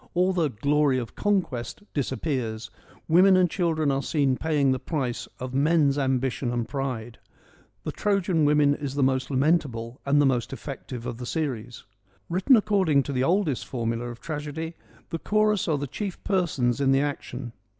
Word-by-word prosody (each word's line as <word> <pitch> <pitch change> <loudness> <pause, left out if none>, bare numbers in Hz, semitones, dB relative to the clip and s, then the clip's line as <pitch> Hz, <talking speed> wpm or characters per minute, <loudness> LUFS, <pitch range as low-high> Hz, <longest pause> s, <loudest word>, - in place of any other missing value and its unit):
All 180 +2 +3
the 165 -4 +1
glory 140 +3 +2
of 120 -3 -5
conquest 190 - -1
' - - -44
disappears: 130 -5 -2 0.4
women 185 +3 +6
and 180 -1 +4
children 160 -4 0
are 135 0 0
seen 140 -1 +1
paying 145 -2 +1
the 130 - 0
price 130 -3 -3
of 130 0 -5
men's 145 0 +3
ambition 130 -2 0
and 120 -2 -2
pride. 125 -4 -4 0.6
The - - -3
Trojan 190 -5 +1
Women 145 -1 +4
is 140 -1 -5
the 140 - +2
most 130 0 +1
lamentable 130 -4 0
and 140 +1 +3
the 145 - +5
most 125 -3 +1
effective 130 -3 -7
of 120 -2 -4
the 125 0 -6
series. 125 -7 -3 0.5
Written 185 +10 +4
according 190 -10 +2
to 140 - -4
the 130 0 +1
oldest 170 -3 +1
formula 115 -1 -2
of 120 -1 -9
tragedy, 155 +1 -5 0.4
the 165 - -2
chorus 210 0 +1
are 155 -3 +2
the 140 - -3
chief 185 - -5
persons 140 - 0
in 135 -1 +3
the 135 +1 +4
action. 135 -4 -4
140 Hz, 170 wpm, -26 LUFS, 125-165 Hz, 0.6 s, women